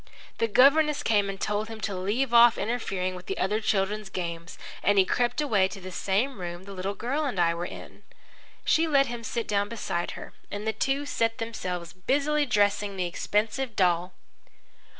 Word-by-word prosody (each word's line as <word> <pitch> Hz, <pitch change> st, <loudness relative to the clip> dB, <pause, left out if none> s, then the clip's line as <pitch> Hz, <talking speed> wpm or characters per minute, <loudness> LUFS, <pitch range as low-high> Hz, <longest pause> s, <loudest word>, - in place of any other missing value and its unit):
The 230 Hz, -, +2 dB
governess 285 Hz, +6 st, +4 dB
came 205 Hz, -3 st, +2 dB
and 195 Hz, -1 st, -5 dB
told 210 Hz, +1 st, -1 dB
him 225 Hz, -1 st, -7 dB
to 200 Hz, -, -2 dB
leave 220 Hz, +8 st, -1 dB
off 235 Hz, 0 st, +7 dB
interfering 195 Hz, -5 st, -2 dB
with 180 Hz, 0 st, -10 dB
the 195 Hz, -, -3 dB
other 210 Hz, +3 st, 0 dB
children's 205 Hz, 0 st, 0 dB
games, 170 Hz, -2 st, -5 dB, 0.2 s
and 205 Hz, +1 st, +3 dB
he 190 Hz, -, +6 dB
crept 245 Hz, +5 st, 0 dB
away 210 Hz, -10 st, +3 dB
to 195 Hz, -, -9 dB
the 185 Hz, 0 st, -8 dB
same 200 Hz, +6 st, -1 dB
room 175 Hz, 0 st, -5 dB
the 200 Hz, -, -10 dB
little 195 Hz, +2 st, -3 dB
girl 265 Hz, +9 st, -2 dB
and 250 Hz, -10 st, -2 dB
I 170 Hz, -1 st, +3 dB
were 170 Hz, +1 st, -4 dB
in. -, -, -11 dB, 0.6 s
She 325 Hz, +1 st, +3 dB
let 280 Hz, -3 st, +4 dB
him 240 Hz, -2 st, -6 dB
sit 230 Hz, 0 st, -3 dB
down 205 Hz, 0 st, 0 dB
beside 190 Hz, -6 st, -3 dB
her, -, -, -9 dB, 0.2 s
and 205 Hz, +1 st, -5 dB
the 220 Hz, -, 0 dB
two 270 Hz, +6 st, 0 dB
set 230 Hz, -5 st, 0 dB
themselves 180 Hz, -7 st, -4 dB
busily 285 Hz, +10 st, +1 dB
dressing 205 Hz, -3 st, +1 dB
the 180 Hz, -, 0 dB
expensive 215 Hz, +7 st, -1 dB
doll. 180 Hz, -1 st, +2 dB
205 Hz, 190 wpm, -27 LUFS, 185-240 Hz, 0.6 s, off